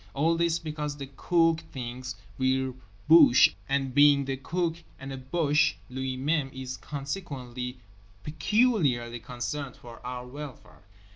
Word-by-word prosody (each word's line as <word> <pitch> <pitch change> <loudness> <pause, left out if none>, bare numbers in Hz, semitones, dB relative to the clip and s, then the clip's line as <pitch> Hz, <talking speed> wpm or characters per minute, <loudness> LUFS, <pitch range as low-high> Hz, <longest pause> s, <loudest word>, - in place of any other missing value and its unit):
All 160 +4 +3
this 170 0 +2
because 150 -2 -4
the 140 -1 -7
Cook 165 0 +3
thinks 125 -1 -6 0.2
we're 130 0 +1 0.3
boches 160 -5 +8 0.2
and 135 -1 0
being 145 0 +6
the 135 0 -2
Cook 165 +5 -2 0.2
and 135 +1 -7
a - - -5
boche 150 +4 +2 0.2
lui 130 0 -3
même 140 0 0
is 130 -1 -6
consequently 135 -5 -5 0.5
peculiarly 150 - +1
concerned 130 +3 -5
for 120 -1 -12
our 125 0 -5
welfare. 140 +1 -10
135 Hz, 130 wpm, -28 LUFS, 130-155 Hz, 0.5 s, boches